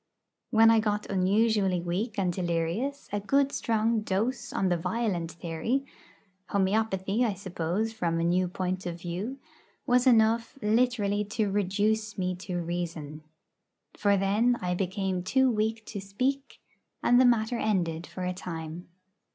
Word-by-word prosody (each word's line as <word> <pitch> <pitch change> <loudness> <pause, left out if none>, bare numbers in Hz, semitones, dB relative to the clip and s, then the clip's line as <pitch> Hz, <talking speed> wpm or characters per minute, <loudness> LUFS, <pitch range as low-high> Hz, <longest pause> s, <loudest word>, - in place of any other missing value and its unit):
When 225 0 +6
I 225 - +5
got 210 -1 -1
unusually 195 0 +2
weak 185 +6 -3
and 185 -3 +1
delirious 175 +11 -2
a 205 - +1
good 275 +7 +2
strong 225 0 +1
dose 230 +5 -2
on 190 - 0
the 175 - +2
'violent' 180 -2 -2
theory 175 +12 -2 0.6
homœopathy, 200 +2 +1
I 215 -5 0
suppose, 190 +3 -2
from 170 -6 -1
a - - 0
new 180 +2 +2
point 185 +1 -3
of 170 0 -5
view 180 +10 -4 0.5
was 250 +1 +3
enough, 230 +2 +3
literally, 210 -2 +1
to 210 0 -1
reduce 205 +2 0
me 185 -1 -1
to 180 -1 -5
reason. 165 -3 -4 0.7
For 200 -1 +2
then 215 +6 +2
I 180 0 -1
became 185 0 -1
too 265 +8 +3
weak 220 0 -1
to 205 - -6
speak, 260 +8 -2 0.4
and 245 +1 +5
the - - +6
matter 235 -1 +2
ended 175 -6 0
for 185 - -6
a 180 0 -1
time. 165 -2 -7
200 Hz, 145 wpm, -28 LUFS, 180-225 Hz, 0.7 s, When